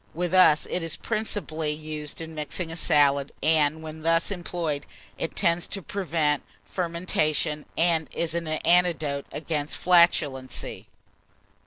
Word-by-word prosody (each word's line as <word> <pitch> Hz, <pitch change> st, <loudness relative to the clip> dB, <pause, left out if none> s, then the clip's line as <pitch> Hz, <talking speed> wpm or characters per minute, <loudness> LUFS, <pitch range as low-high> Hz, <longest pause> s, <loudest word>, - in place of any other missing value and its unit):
With 175 Hz, +1 st, -2 dB
us, 180 Hz, -5 st, +6 dB
it 180 Hz, -, -1 dB
is 165 Hz, -1 st, -4 dB
principally 180 Hz, -9 st, -2 dB
used 155 Hz, 0 st, -6 dB
in 160 Hz, 0 st, -7 dB
mixing 160 Hz, +2 st, -3 dB
a -, -, -5 dB
salad, 145 Hz, -4 st, +3 dB
and 155 Hz, 0 st, +2 dB
when 155 Hz, 0 st, -8 dB
thus 165 Hz, +4 st, +2 dB
employed, 170 Hz, -5 st, -3 dB, 0.3 s
it 165 Hz, -, -3 dB
tends 170 Hz, -2 st, +2 dB
to 195 Hz, -, -4 dB
prevent 160 Hz, -7 st, 0 dB, 0.2 s
fermentation, 165 Hz, -4 st, -1 dB
and 165 Hz, -2 st, +2 dB
is 165 Hz, -1 st, -2 dB
an 170 Hz, -1 st, -2 dB
antidote 155 Hz, -3 st, +1 dB
against 150 Hz, -1 st, -3 dB
flatulency. 160 Hz, -7 st, +2 dB
160 Hz, 130 wpm, -26 LUFS, 150-175 Hz, 0.3 s, us